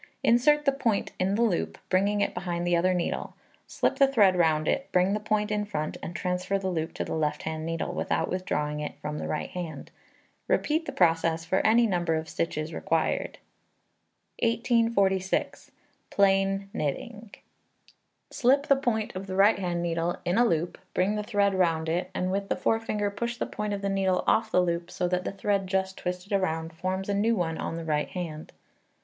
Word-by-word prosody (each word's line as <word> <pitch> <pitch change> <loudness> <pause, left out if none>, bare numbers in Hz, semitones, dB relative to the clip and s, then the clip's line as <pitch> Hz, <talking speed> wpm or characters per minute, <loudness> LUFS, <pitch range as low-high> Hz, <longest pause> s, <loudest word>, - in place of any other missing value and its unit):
Insert 295 +6 +4
the 275 - +5
point 245 -7 0
in 190 +2 +1
the 230 - +2
loop, 80 - 0
bringing 200 +2 +2
it - - 0
behind 175 -1 -3
the 175 0 +2
other 180 +2 +3
needle, 175 - -2 0.3
slip - - 0
the 275 - +6
thread 210 -9 +4
round 160 -3 +2
it, 275 - -1
bring 185 +2 +3
the 210 - 0
point 210 0 0
in 210 0 0
front, 155 -7 -3
and 170 - -6
transfer 185 +2 -1
the 190 -1 -2
loop 160 -2 -2
to - - -2
the - - -4
left 150 -2 -1
hand 160 0 -4
needle 165 0 -2
without 160 - -1
withdrawing 150 -5 -2
it 150 - -5
from 150 0 -4
the - - -4
right 155 - -3
hand. 165 -5 -6 0.6
Repeat 320 +2 +1
the - - -2
process 165 -1 +2
for 190 +3 +1
any 230 +2 +4
number 175 -5 +1
of 160 0 -3
stitches 155 0 -3
required. 165 0 -1 1.0
1846. 230 -5 +1 0.4
Plain 195 0 +2
Knitting. 220 - -4 1.0
Slip 275 +3 +3
the 280 -3 +5
point 235 -7 -1
of 190 +1 -5
the 185 - -4
right 200 +2 +5
hand 175 -2 -2
needle 170 0 -1
in 175 +6 +2
a 240 - +5
loop, 170 -5 -1 0.2
bring 190 +3 +2
the 210 - -1
thread 205 -2 +1
round 165 -4 +1
it, 175 +3 -1
and 185 0 -1
with 195 +1 -2
the - - +1
forefinger 215 -2 0
push 235 +3 -3
the - - -1
point 210 0 -4
of 200 -1 -3
the - - 0
needle 195 -2 +1
off - - +2
the 180 - +4
loop 170 0 -2
so 180 0 -1
that 180 0 -1
the - - -2
thread 195 -1 -1
just 190 0 -1
twisted 180 +2 -5
round 165 -4 -1
forms 185 +3 -3
a 205 - 0
new 220 +3 +2
one 165 -4 -2
on - - -3
the 165 -1 -5
right 150 -2 0
hand. 165 -4 -6
185 Hz, 195 wpm, -27 LUFS, 165-210 Hz, 1.0 s, the